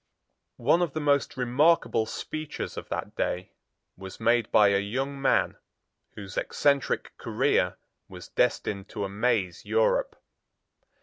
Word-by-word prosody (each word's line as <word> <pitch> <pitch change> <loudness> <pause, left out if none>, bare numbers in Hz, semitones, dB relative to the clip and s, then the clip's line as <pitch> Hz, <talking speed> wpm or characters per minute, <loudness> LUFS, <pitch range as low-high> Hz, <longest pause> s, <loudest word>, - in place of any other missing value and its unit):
One 150 +8 +3
of 175 - 0
the 155 - -2
most 145 -2 +1
remarkable 125 -2 +2
speeches 155 +4 -5
of - - -7
that - - -4
day 90 +1 -2 0.4
was 95 0 -10
made 115 -1 +2
by 105 -1 +6
a 100 0 +3
young 135 +7 -3
man, 135 - +2 0.6
whose 100 -2 -8
eccentric 140 -1 0
career - - +1 0.3
was - - -10
destined 100 -1 0
to 100 - -3
amaze 100 -2 -1
Europe. - - +1
125 Hz, 125 wpm, -27 LUFS, 100-145 Hz, 0.6 s, by